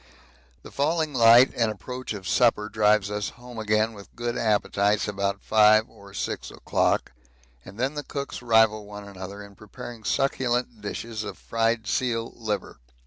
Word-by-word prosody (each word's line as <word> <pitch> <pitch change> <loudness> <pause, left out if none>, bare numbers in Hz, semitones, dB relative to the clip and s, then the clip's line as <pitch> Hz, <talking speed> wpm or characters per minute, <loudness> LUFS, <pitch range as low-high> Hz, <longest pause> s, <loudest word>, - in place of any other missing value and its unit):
The - - -11
falling 155 +1 0
light 120 +1 +7
and 115 -2 +1
approach 125 +3 -7
of 95 -2 -7
supper 110 -2 +3
drives 105 -2 +2
us 105 -1 -2
home 120 -1 -10
again 110 +1 +1
with 100 -2 -14
good 120 0 -3
appetites 105 -1 +1
about 100 -1 -2
5 110 0 +5
or 100 -3 -15
6 100 - -4
o'clock, - - 0 0.5
and 95 +3 -12
then 130 +4 0
the 150 - -4
cooks 140 -2 -6
rival 110 -3 +3
one 105 0 -9
another 100 +1 -8
in 100 0 -13
preparing 110 +2 -10
succulent 125 -2 0
dishes 110 +1 -5
of 100 -2 -7
fried 115 0 0
seal 115 +1 -1
liver. 110 -3 -4
110 Hz, 155 wpm, -25 LUFS, 105-120 Hz, 0.5 s, light